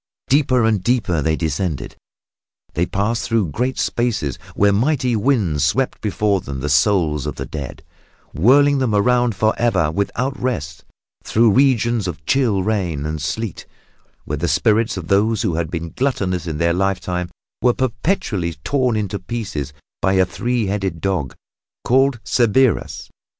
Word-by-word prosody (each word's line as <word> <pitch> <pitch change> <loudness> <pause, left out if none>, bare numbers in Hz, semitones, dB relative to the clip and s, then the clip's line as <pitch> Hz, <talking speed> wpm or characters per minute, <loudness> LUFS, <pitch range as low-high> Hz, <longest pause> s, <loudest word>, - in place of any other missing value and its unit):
Deeper 130 -3 +3
and 110 -4 +1
deeper 105 -10 +1
they 80 +2 +1
descended. 80 -4 -3 0.8
They 85 +2 0
passed 105 +4 -1
through 110 -7 +1
great 125 - -2
spaces 105 - -1 0.2
where 100 0 +3
mighty 125 +2 +1
winds 105 - +1
swept 125 - 0
before 100 -1 0
them 70 -3 -6
the 70 +3 -3
souls 75 -2 +2
of 75 - -4
the - - -5
dead, 70 -4 -7 0.5
whirling 140 - +4
them 120 -5 +1
around 120 +2 +2
forever 110 -6 +1
without 125 +9 -2
rest; 75 - -3 0.4
through 115 0 +3
regions 120 -4 +2
of 75 -4 -6
chill 115 -8 +2
rain 90 -9 -1
and 80 -1 -3
sleet, 110 +5 -4 0.6
where - - -3
the - - 0
spirits 110 -1 +2
of 85 -3 -6
those 105 +3 +2
who 85 - 0
had 80 -1 -2
been 85 -1 -5
gluttonous 95 - -1
in 80 -2 -3
their 85 +1 +2
lifetime 90 -1 -1 0.3
were 125 - +4
perpetually 115 - -1
torn 130 -4 +1
into 100 -1 -2
pieces 100 - -4 0.3
by 95 - +2
a 95 -1 +4
three 120 +3 -1
headed 95 -4 -2
dog 85 -8 -2 0.5
called 135 0 +2
Cerberus. 120 -1 +1
100 Hz, 150 wpm, -20 LUFS, 85-120 Hz, 0.8 s, whirling